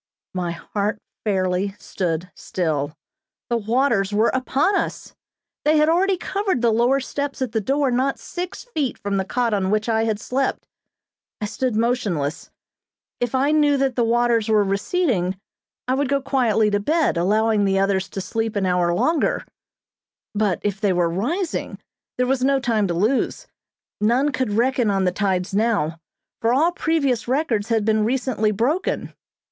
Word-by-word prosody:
My 180 -2 -2
heart 205 +4 -3 0.3
fairly 190 -1 0
stood 175 -1 -3
still. 155 -4 -2 0.5
The 235 - +3
waters 225 -2 +1
were 215 +3 +3
upon 270 +8 +1
us! - - -3 0.5
They 305 +1 +4
had 305 +1 +4
already 375 +3 +2
covered 385 - -1
the 235 - +4
lower 240 +5 +3
steps 280 +1 -4
at 260 -4 -2
the 220 0 0
door 275 +4 +1
not 260 +3 +1
six 360 0 -6
feet 310 - -2
from 200 -1 -2
the 190 - +1
cot 240 +1 0
on 190 -2 0
which 215 +2 0
I 225 -1 +2
had 215 -2 -1
slept. 260 +3 -2 0.7
I 210 - -2
stood 250 +2 -2
motionless. 215 - -1 0.7
If 245 +1 -1
I 275 +3 +2
knew 295 -2 +3
that 265 -2 0
the 240 - +2
waters 235 -1 +2
were 215 -1 +4
receding, 195 - 0 0.5
I 255 - +2
would 275 0 0
go 280 0 +2
quietly 235 -6 +2
to 205 - +2
bed, 310 - +1
allowing 210 +4 +2
the 195 -1 +2
others 195 -1 +1
to 195 - -5
sleep 225 +3 -2
an 200 -2 0
hour 180 -1 +2
longer; 315 - +1 0.9
but 205 -4 +1
if 205 -1 -2
they 200 -3 +2
were 175 -1 +2
rising 315 - -2 0.4
there 250 - +2
was 255 0 0
no 275 0 +3
time 225 -5 +1
to 170 - -2
lose. 240 - 0 0.6
None 250 +7 +3
could 255 -5 -1
reckon 245 +1 +2
on 195 -1 +1
the 180 - +2
tides 190 -1 -1
now, 200 -7 +1 0.4
for 230 +1 +2
all 325 +6 +3
previous 285 -9 0
records 245 -6 0
had 225 -3 +1
been 215 -1 +2
recently 240 -2 0
broken. 245 - -1
225 Hz, 165 wpm, -22 LUFS, 200-265 Hz, 0.9 s, They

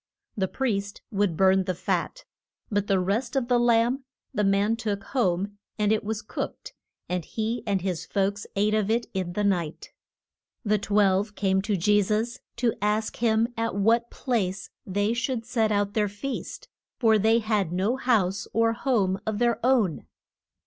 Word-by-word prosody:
The 190 -2 0
priest 200 -4 -2
would 200 -5 0
burn 190 0 +4
the 185 -1 -1
fat, - - -2 0.5
but 205 -1 0
the 195 -2 +3
rest 220 +8 -1
of 260 -2 0
the 245 -1 +4
lamb 240 +3 +3 0.3
the 210 - 0
man 200 +3 +2
took 210 -3 -3
home, 200 -4 -1 0.2
and 210 -1 +2
it 220 - +1
was 215 +1 -3
cooked, - - -6 0.3
and 180 -1 -2
he 225 +6 -3
and 195 -2 +1
his 180 -3 -3
folks 200 +1 -1
ate 210 +2 +2
of 215 -1 +1
it 230 +1 +1
in 185 -2 -2
the 210 - -1
night. 175 -6 -1 0.7
The 210 0 +2
twelve 205 0 +2
came 190 -1 +1
to 205 0 -1
Je 205 +4 +4
sus 215 +5 -1 0.2
to 235 -1 +1
ask 210 +1 0
him 225 0 +2
at 230 -1 -2
what 230 +4 +2
place 195 -7 -2 0.2
they 205 +3 +1
should 235 -1 -2
set 225 -3 +1
out 205 -1 +1
their 210 -2 +1
feast. 215 +7 -6 0.3
For 220 -3 +4
they 220 +3 +4
had 210 -6 0
no 190 +7 +1
house 210 -8 +1
or 230 0 +3
home 210 -7 +1
of 215 -1 -1
their 235 -1 +1
own. 235 - +2
210 Hz, 170 wpm, -26 LUFS, 195-230 Hz, 0.7 s, burn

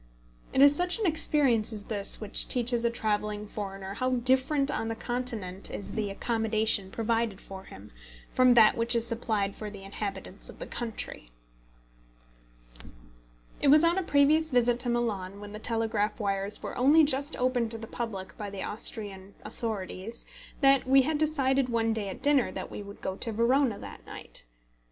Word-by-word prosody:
It 270 - +5
is 285 0 +7
such 355 +4 0
an 445 - -2
experience 290 - +2
as 210 -2 -7
this 205 -2 -1
which 215 -2 +1
teaches 240 -1 +2
a 235 - +3
travelling 210 -2 -2
foreigner 195 -2 -6
how 255 +5 -1
different 265 +3 +2
on 225 - -2
the 225 - -2
Continent 225 -6 -2
is 200 - -6
the 215 -2 -2
accommodation 220 -1 0
provided 225 -2 -1
for 190 0 -10
him, 100 +2 -13 0.4
from 255 -1 +5
that 220 -2 +7
which 235 +1 +3
is 230 -1 +1
supplied 220 -4 -1
for 215 - -6
the 200 -1 -10
inhabitants 195 -1 -6
of - - -11
the - - -6
country. 225 - -6 2.3
It - - +2
was 300 +3 +7
on 340 +3 +3
a - - 0
previous 310 0 +3
visit 245 -2 +2
to 245 - +1
Milan, 205 -5 -2
when 205 0 -9
the 210 - -7
telegraph 225 -2 -1
wires 200 -1 -2
were - - -5
only 290 +6 +5
just 285 +1 +1
opened 250 -2 +1
to 225 - -1
the 225 - -7
public 205 -5 -6
by 205 -1 -4
the 195 -1 -6
Austrian 200 -2 -4
authorities, 215 -1 -4 0.4
that 275 -1 +4
we 270 0 +6
had 300 +2 -1
decided 275 -4 +1
one 225 -1 +1
day 210 -3 -2
at - - -9
dinner 285 -3 +3
that - - -6
we - - -6
would 200 0 -11
go 190 - -2
to 230 - -1
Verona 235 +1 +2
that - - -10
night. - - -6
230 Hz, 175 wpm, -28 LUFS, 205-255 Hz, 2.3 s, is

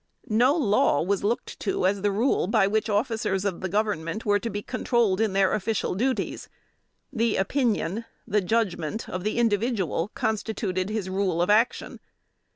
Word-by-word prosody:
No 245 +7 +4
law 210 - +2
was 195 +3 -1
looked 225 +4 -2
to 195 -3 -1
as 195 +1 +1
the 205 - +2
rule 215 -1 +1
by 215 -1 +3
which 215 +3 0
officers 205 -3 0
of 195 -3 -1
Government 205 -1 -1
were 205 -1 +3
to 230 - -4
be 205 -1 -4
controlled 235 -6 +1
in 215 -3 +1
their 195 -1 +3
official 215 0 -1
duties. 255 +7 -2 0.6
The 230 -3 +1
opinion, 225 -1 0 0.2
the 210 +1 +2
judgment, 195 -2 -1
of 185 0 -5
the 215 +3 -1
individual 210 - 0
constituted 200 -3 -2
his 215 -3 -3
rule 190 -2 -1
of 175 +4 +2
action. 225 +4 +1
205 Hz, 160 wpm, -26 LUFS, 190-225 Hz, 0.6 s, No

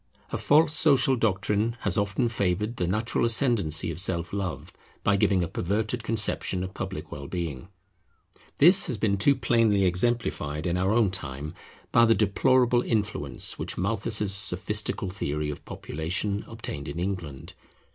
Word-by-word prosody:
A - - -2
false 155 +2 +4
social 145 -3 +4
doctrine 105 +1 0
has 100 -2 -1
often 100 +4 0
favoured 105 +1 -2
the 90 - -1
natural 110 +6 0
ascendency 115 - +2
of 80 - -2
Self 90 -2 -1
love 100 -2 -4 0.3
by 100 - +3
giving 95 -2 +2
a - - -2
perverted 110 +8 -2
conception 110 -4 +1
of 95 0 -7
public - - -6
well 70 -1 -7
being. 85 -6 -5 0.9
This 180 +6 +6
has 125 - -2
been 100 -1 +1
too 140 +9 +3
plainly 115 -6 +2
exemplified 90 -6 -1
in 85 -1 0
our 95 +2 0
own 110 -4 +2
time 75 -3 -6 0.4
by 115 - +5
the 115 -1 +4
deplorable 120 +4 +2
influence 105 -4 0
which - - -4
Malthus's 105 +1 0
sophistical 100 0 0
theory 75 -5 -3
of 70 - -9
population 95 +6 -3
obtained 95 -10 -7
in - - -6
England. 85 -7 -5
100 Hz, 150 wpm, -26 LUFS, 90-115 Hz, 0.9 s, This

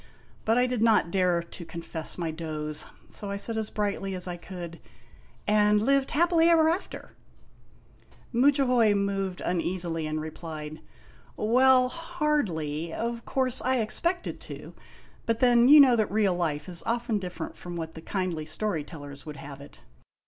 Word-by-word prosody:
But 225 +2 +3
I 250 - +4
did 250 -3 -2
not 220 -6 +4
dare 180 -2 +2
to 170 +1 -10
confess 165 -1 -4
my 170 -2 -2
doze, 155 -2 -4 0.2
so 205 - -6
I 200 - -3
said 225 +3 -1
as 220 -1 -2
brightly 200 -2 -2
as 180 0 -6
I 175 - -3
could: 175 -1 -8 0.4
" - - -26 0.3
And 210 0 +4
lived 275 +4 +2
happily 335 +1 +3
ever 320 -2 +5
after! 345 +4 -4 0.7
" - - -29
Mudjahoy 250 -4 +4
moved 195 -2 -1
uneasily, 170 -2 -1
and 155 0 -2
replied: 155 -1 -7 0.6
"Well, 255 +3 +4
hardly. 235 - -2
Of 235 +5 -4
course 260 -2 0
I 260 +1 +1
expected 340 - -1
to; - - -9 0.5
but 230 -1 +1
then, 245 -1 +5
you 295 +2 +9
know 265 -4 +7
that 215 -3 +1
real 205 -3 +2
life 155 -4 -2
is 175 -2 -3
often 235 -2 0
different 180 -2 -6
from 175 -1 -8
what 160 -1 -5
the 160 - -9
kindly 175 -4 -3
story 160 0 -1
tellers 145 -2 -10
would 150 -1 -7
have 140 0 -9
it. 140 - -14
200 Hz, 165 wpm, -27 LUFS, 165-245 Hz, 0.7 s, you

